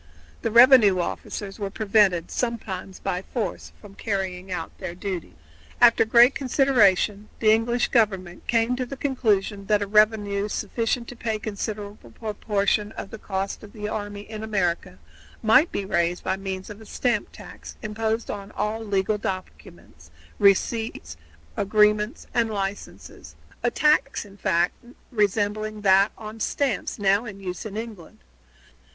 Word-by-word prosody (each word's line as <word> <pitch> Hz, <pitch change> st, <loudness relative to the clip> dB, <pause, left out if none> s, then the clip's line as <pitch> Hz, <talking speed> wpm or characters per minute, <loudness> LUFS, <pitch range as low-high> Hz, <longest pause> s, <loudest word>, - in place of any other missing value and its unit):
The -, -, -1 dB
revenue 235 Hz, -4 st, +7 dB
officers 195 Hz, +3 st, -4 dB
were 200 Hz, -1 st, -2 dB
prevented, 195 Hz, -5 st, +2 dB
sometimes 195 Hz, -6 st, -3 dB
by 180 Hz, -, -3 dB
force, 230 Hz, +3 st, -4 dB
from 205 Hz, -2 st, -13 dB
carrying 190 Hz, -3 st, -3 dB
out 165 Hz, -3 st, -4 dB
their 170 Hz, -, -5 dB
duties. 185 Hz, -2 st, -5 dB, 0.4 s
After 235 Hz, -2 st, +6 dB
great 240 Hz, +4 st, +6 dB
consideration 215 Hz, -7 st, +2 dB
the 215 Hz, -1 st, +4 dB
English 235 Hz, +2 st, +2 dB
government 190 Hz, -7 st, 0 dB
came 230 Hz, +1 st, +2 dB
to 255 Hz, -, -2 dB
the 275 Hz, -, -7 dB
conclusion 210 Hz, -7 st, 0 dB
that 210 Hz, -1 st, +3 dB
a -, -, -2 dB
revenue 210 Hz, -1 st, +2 dB
sufficient 230 Hz, +3 st, -2 dB
to 245 Hz, -, -9 dB
pay 225 Hz, -2 st, -2 dB
a -, -, -4 dB
considerable 210 Hz, 0 st, -6 dB
proportion 210 Hz, -1 st, 0 dB
of -, -, -7 dB
the 220 Hz, -, -8 dB
cost 195 Hz, -1 st, -3 dB
of 205 Hz, -2 st, -13 dB
the 210 Hz, -2 st, -5 dB
army 205 Hz, -1 st, -4 dB
in 215 Hz, +1 st, -8 dB
America 185 Hz, -4 st, -1 dB, 0.5 s
might 225 Hz, +9 st, +5 dB
be 200 Hz, -, -3 dB
raised 170 Hz, -1 st, 0 dB
by -, -, 0 dB
means 190 Hz, 0 st, -6 dB
of 210 Hz, +1 st, -11 dB
a -, -, -12 dB
stamp 240 Hz, -3 st, -1 dB
tax -, -, -11 dB
imposed 220 Hz, +1 st, -2 dB
upon 200 Hz, -1 st, -7 dB
all 215 Hz, +2 st, -2 dB
legal 205 Hz, 0 st, 0 dB
documents, 85 Hz, -, -7 dB, 0.3 s
receipts, 200 Hz, -, +1 dB, 0.4 s
agreements, 210 Hz, -, +2 dB
and 235 Hz, -2 st, +2 dB
licenses 195 Hz, -, -6 dB, 0.3 s
a 240 Hz, -, +2 dB
tax, 295 Hz, -2 st, +2 dB
in 200 Hz, -1 st, -15 dB
fact, 175 Hz, -3 st, +1 dB, 0.4 s
resembling 210 Hz, 0 st, 0 dB
that 195 Hz, +1 st, +5 dB
on 215 Hz, +1 st, -9 dB
stamps 265 Hz, 0 st, -1 dB
now 200 Hz, +1 st, +2 dB
in 200 Hz, -3 st, -8 dB
use 185 Hz, +3 st, -5 dB
in 210 Hz, 0 st, -7 dB
England. 220 Hz, -7 st, -8 dB
210 Hz, 145 wpm, -24 LUFS, 195-225 Hz, 0.5 s, revenue